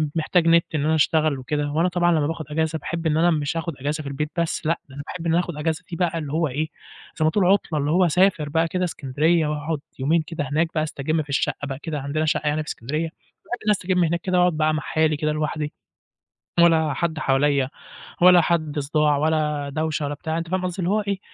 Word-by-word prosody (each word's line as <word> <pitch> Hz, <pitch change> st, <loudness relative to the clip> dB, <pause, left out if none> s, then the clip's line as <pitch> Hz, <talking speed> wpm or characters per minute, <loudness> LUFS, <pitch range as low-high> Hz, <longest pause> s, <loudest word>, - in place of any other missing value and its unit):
محتاج 165 Hz, +1 st, +2 dB
نت 165 Hz, 0 st, +5 dB
إن 150 Hz, -1 st, 0 dB
أنا 160 Hz, +1 st, +3 dB
أشتغل 155 Hz, -2 st, +2 dB
وكده 145 Hz, +2 st, -2 dB
وأنا 165 Hz, +4 st, +2 dB
طبعًا 175 Hz, 0 st, +2 dB
لما 150 Hz, -3 st, +2 dB
باخد 165 Hz, -1 st, -4 dB
أجازة، 160 Hz, 0 st, 0 dB
باحب 165 Hz, +2 st, -3 dB
إنّي 160 Hz, +3 st, +3 dB
مش 150 Hz, +1 st, -1 dB
هاخد 165 Hz, -1 st, -3 dB
أجازة 150 Hz, +3 st, -2 dB
في 140 Hz, -, -5 dB
البيت، 150 Hz, +2 st, -3 dB
بس 170 Hz, -2 st, -1 dB
لأ، 165 Hz, +2 st, +1 dB
أنا 140 Hz, +2 st, -7 dB
باحب 175 Hz, -2 st, -6 dB
إنّي 165 Hz, +2 st, +3 dB
آخد 175 Hz, -, -3 dB
الأجازة 160 Hz, +3 st, -2 dB
دي 170 Hz, -, -3 dB
بقى 170 Hz, -1 st, 0 dB
اللي 150 Hz, -2 st, -5 dB
هو 160 Hz, 0 st, +1 dB
إيه، 150 Hz, +4 st, -2 dB, 0.5 s
زي 155 Hz, -, 0 dB
ما 155 Hz, -, +3 dB
تقول 195 Hz, -1 st, +2 dB
عطلة، 180 Hz, -5 st, +2 dB
اللي 145 Hz, +1 st, 0 dB
هو 180 Hz, +2 st, +4 dB
أسافر 175 Hz, -3 st, +2 dB
بقى 165 Hz, +2 st, +1 dB
كده 180 Hz, +2 st, -2 dB
إسكندرية 155 Hz, +1 st, +1 dB
وأقعد 150 Hz, 0 st, -2 dB, 0.2 s
يومين 160 Hz, +5 st, +2 dB
كده 155 Hz, -2 st, -4 dB
هناك 160 Hz, +3 st, +2 dB
بقى 155 Hz, -, +2 dB
أستجم 155 Hz, +1 st, -1 dB
في 145 Hz, -, -21 dB
الشقة 145 Hz, +1 st, -1 dB
بقى 135 Hz, 0 st, -5 dB
كده 155 Hz, -3 st, -4 dB
عندنا 145 Hz, +3 st, -1 dB
شقة 155 Hz, -1 st, 0 dB
يعني 150 Hz, +1 st, +1 dB
في 150 Hz, -, -18 dB
إسكندرية. 150 Hz, +8 st, -3 dB
أقعد 215 Hz, +6 st, -7 dB
أستجم 185 Hz, -3 st, +1 dB
هناك 170 Hz, +1 st, 0 dB
كده، 185 Hz, -1 st, 0 dB
وأقعد 180 Hz, -2 st, +3 dB, 0.2 s
مع 155 Hz, -, 0 dB
حالي 155 Hz, -1 st, +1 dB
كده 150 Hz, 0 st, 0 dB
لوحدي، 150 Hz, 0 st, -2 dB, 0.9 s
ولا 160 Hz, -3 st, +4 dB
حد 160 Hz, 0 st, -2 dB
حواليّا، 135 Hz, -1 st, +2 dB, 0.5 s
ولا 180 Hz, -1 st, +8 dB
حد 160 Hz, -3 st, 0 dB
صداع، 150 Hz, +1 st, +2 dB
ولا 150 Hz, -1 st, 0 dB
دوشة، 155 Hz, -1 st, -1 dB
ولا 145 Hz, -, -3 dB
بتاع 160 Hz, +1 st, -3 dB
أنت 165 Hz, 0 st, -4 dB
فاهم 185 Hz, 0 st, -1 dB
قصدي؟ 180 Hz, +1 st, -4 dB
اللي 175 Hz, +1 st, 0 dB
هو 215 Hz, +1 st, +2 dB
إيه، 200 Hz, -1 st, -2 dB
155 Hz, 225 wpm, -23 LUFS, 150-170 Hz, 0.9 s, ولا